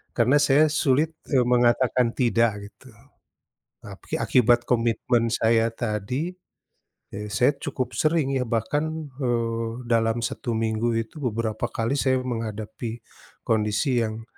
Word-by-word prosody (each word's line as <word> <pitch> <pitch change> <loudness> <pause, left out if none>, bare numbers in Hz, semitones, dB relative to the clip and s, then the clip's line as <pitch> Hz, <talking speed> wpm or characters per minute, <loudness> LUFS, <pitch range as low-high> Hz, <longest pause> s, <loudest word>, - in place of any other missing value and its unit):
karena 125 +4 +4
saya 145 +2 +5
sulit, 150 +2 +2 0.2
eee, 130 - +5
mengatakan 120 0 +3
tidak 115 -4 +1
gitu, 130 - -18 0.9
tapi - - -7
akibat 120 -1 +4
komitmen 115 0 +1
saya 115 0 +2
tadi, 120 - -3 0.8
eee, 105 +1 -6
saya 125 +7 +3
cukup 130 -4 -4
sering 155 -1 +1
ya 125 - -1
bahkan, 150 +7 -2
eee, 115 -3 -1 0.2
dalam 115 0 +2
1 120 +2 -4
minggu 110 +1 0
itu 115 +7 -6
beberapa 110 0 -2
kali 115 +4 -1
saya 130 -1 +2
menghadapi, 115 -1 -5 0.5
kondisi 110 +4 +1
yang, 110 +1 -5
120 Hz, 120 wpm, -24 LUFS, 115-130 Hz, 0.9 s, saya